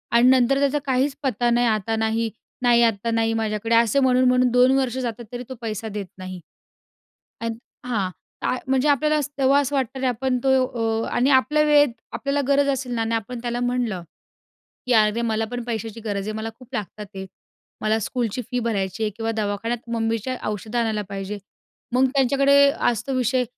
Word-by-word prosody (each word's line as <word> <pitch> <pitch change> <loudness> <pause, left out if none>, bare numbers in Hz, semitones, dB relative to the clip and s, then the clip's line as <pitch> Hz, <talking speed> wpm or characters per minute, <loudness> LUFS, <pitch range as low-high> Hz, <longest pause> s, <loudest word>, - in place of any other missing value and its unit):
आणि 240 +1 +6
नंतर 260 +1 +4
त्याचा 285 +1 +2
काहीच 270 +1 +1
पत्ता 240 -2 +1
नाही, 240 0 +3
आता 220 0 0
नाही. 220 +1 0 0.3
नाही, 240 -1 +4
आत्ता 230 0 +1
नाही 225 0 +1
माझ्याकडे 225 0 0
असे 230 +3 +4
म्हणून, 255 -1 +4
म्हणून 250 0 +3
2 250 +1 +5
वर्ष 260 -2 0
जातात 240 -2 -4
तरी 245 0 -5
तो 260 - -6
पैसा 220 -1 -4
देत 205 -1 -5
नाही 185 0 -7 1.0
आणि 230 0 -2 0.3
हां, 210 -7 -1 0.3
ता - - +1
म्हणजे 265 +2 +2
आपल्याला 300 +2 +3
अस 295 0 -2
तेव्हा 275 +1 +4
असं 285 +1 -2
वाटतं 265 -1 -1
अरे 260 - 0
आपण 250 +1 0
तो 270 - +2 0.6
अ, - - -5
आणि 255 +3 +2
आपल्या 300 +3 +4
वेळेत 290 -4 +4 0.2
आपल्याला 280 +1 -1
गरज 280 0 +3
असेल 270 -2 -2
ना 225 - -1
आणि 225 0 0
आपण 235 +3 -4
त्याला 240 0 -2
म्हणलं 245 -7 -1 0.8
की, 250 - +1
"अरे 215 +1 +3
मला 225 -1 0
पण 245 -1 -4
पैशाची 225 -1 -4
गरज 200 -2 -2
आहे. - - -2
मला 220 +1 -4
खूप 255 -2 -15
लागतात 210 0 -5
आहे. 190 0 -6 0.5
मला 215 +1 +1
स्कूलची 240 +1 -2
फी 250 - -1
भरायची 200 -3 -2
आहे 215 - +1
किंवा 225 0 -2
दवाखान्यात 220 +3 -2
मम्मीच्या 230 +2 -1
औषधं 215 +3 -3
आणायला 220 -3 0
पाहिजे." 195 +1 -5 0.6
मग 260 +1 +5
त्यांच्याकडे 275 +1 +4 0.3
असतो 240 +3 -3
विषय, 250 0 +1
235 Hz, 185 wpm, -23 LUFS, 220-260 Hz, 1.0 s, आणि